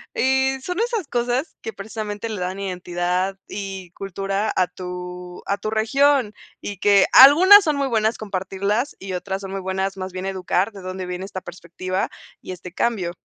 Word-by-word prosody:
Y 265 Hz, 0 st, +2 dB
son 360 Hz, +7 st, -4 dB
esas 460 Hz, -7 st, -1 dB
cosas 245 Hz, +6 st, -1 dB
que 225 Hz, -, -5 dB
precisamente 210 Hz, +1 st, -5 dB
le 215 Hz, -4 st, -5 dB
dan 185 Hz, +2 st, -3 dB
identidad 180 Hz, 0 st, -2 dB
y 195 Hz, -3 st, -6 dB
cultura 195 Hz, +2 st, -2 dB
a 185 Hz, -, +3 dB
tu 180 Hz, 0 st, -8 dB
a 200 Hz, -, 0 dB
tu 215 Hz, -, -4 dB
región 250 Hz, +2 st, +2 dB, 0.3 s
y 205 Hz, -, -6 dB
que 200 Hz, -1 st, +5 dB
algunas 370 Hz, +10 st, +9 dB
son 305 Hz, -4 st, +1 dB
muy 280 Hz, -1 st, 0 dB
buenas 220 Hz, -2 st, +1 dB
compartirlas 200 Hz, +4 st, -2 dB
y 190 Hz, -1 st, -6 dB
otras 190 Hz, +2 st, -3 dB
son 195 Hz, -1 st, -7 dB
muy 195 Hz, 0 st, -4 dB
buenas, 190 Hz, +1 st, -2 dB
más 185 Hz, 0 st, -5 dB
bien 185 Hz, +1 st, -5 dB
educar 190 Hz, +1 st, 0 dB
de 200 Hz, -2 st, -11 dB
dónde 185 Hz, 0 st, -5 dB
viene 180 Hz, +1 st, -5 dB
esta 190 Hz, -1 st, -7 dB
perspectiva 180 Hz, +2 st, -4 dB, 0.3 s
y -, -, -8 dB
este 180 Hz, -1 st, -9 dB
cambio. 190 Hz, -6 st, -1 dB
195 Hz, 175 wpm, -22 LUFS, 185-225 Hz, 0.3 s, algunas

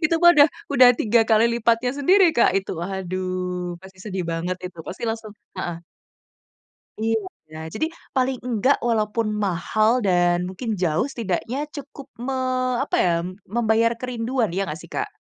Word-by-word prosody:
Itu 335 Hz, 0 st, +3 dB
mah 345 Hz, -, +9 dB
udah 295 Hz, +1 st, +7 dB, 0.2 s
udah 255 Hz, -3 st, +7 dB
3 230 Hz, 0 st, +2 dB
kali 220 Hz, 0 st, +4 dB
lipatnya 235 Hz, +2 st, +2 dB
sendiri, 365 Hz, +4 st, +5 dB
Kak, 235 Hz, -, +4 dB
itu, 190 Hz, -, -7 dB
waduh 185 Hz, -1 st, -3 dB
pasti 190 Hz, -1 st, -14 dB
sedih 190 Hz, -4 st, -3 dB
banget 175 Hz, +2 st, -2 dB
itu 175 Hz, -2 st, -12 dB
pasti 190 Hz, -, -7 dB
langsung 225 Hz, -2 st, -4 dB, 0.3 s
heeh. 170 Hz, -2 st, -4 dB, 1.2 s
Iya, 200 Hz, -8 st, -3 dB, 0.2 s
jadi 315 Hz, -, 0 dB, 0.3 s
paling 260 Hz, 0 st, +1 dB
enggak 250 Hz, +3 st, +3 dB
walaupun 220 Hz, 0 st, 0 dB, 0.2 s
mahal 215 Hz, +4 st, +1 dB
dan 175 Hz, -1 st, +3 dB
mungkin 205 Hz, +6 st, -6 dB
jauh 170 Hz, -, +1 dB
setidaknya 230 Hz, 0 st, -3 dB, 0.2 s
cukup 280 Hz, -1 st, -9 dB, 0.2 s
me 270 Hz, 0 st, -2 dB, 0.5 s
apa -, -, -2 dB
ya, 175 Hz, -, +3 dB, 0.4 s
membayar 230 Hz, 0 st, +3 dB
kerinduan 245 Hz, -2 st, -1 dB
iya 190 Hz, -, -1 dB
enggak 155 Hz, -, -5 dB
sih, -, -, -14 dB
Kak? -, -, -2 dB
220 Hz, 150 wpm, -23 LUFS, 185-245 Hz, 1.2 s, mah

